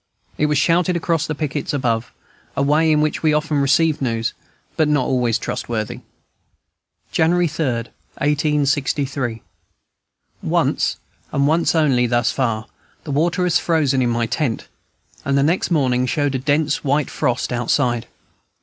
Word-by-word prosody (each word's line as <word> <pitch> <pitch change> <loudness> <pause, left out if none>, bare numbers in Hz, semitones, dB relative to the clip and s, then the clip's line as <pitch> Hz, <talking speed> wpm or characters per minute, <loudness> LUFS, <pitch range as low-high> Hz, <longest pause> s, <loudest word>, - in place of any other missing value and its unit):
It 150 - +1
was 150 -1 +1
shouted 175 +4 +2
across 165 -2 0
by - - -7
the 155 - -4
pickets 150 -1 -3
above, 120 -4 -1 0.5
a 140 - +2
way 155 +3 +3
in 150 -1 +3
which 155 0 -1
we 155 -2 +3
often 150 -1 0
receive 150 +3 +2
news, 115 -3 -1 0.4
but 155 - +2
not 145 -4 +2
always 120 -3 +1
trustworthy. 115 -2 -4 1.1
January 175 +2 +2
3, 155 +1 -3
1863. 140 0 -1 1.0
Once, - - 0 0.3
and 140 0 +1
once 165 +3 +2
only, 135 -6 +3
thus 120 0 +1
far, 115 -5 -1 0.4
the 145 - -6
water 170 +6 +1
has 170 -3 +3
frozen 145 -6 +1
in 120 - +1
my 115 0 0
tent; 125 -1 -2 0.6
and 140 0 +1
the 140 - +3
next 170 +6 +1
morning 130 -6 +1
showed 145 +2 0
a 130 - -1
dense 145 +2 0
white 145 +1 0
frost 125 0 -1
outside. 120 0 0
145 Hz, 150 wpm, -20 LUFS, 125-155 Hz, 1.1 s, way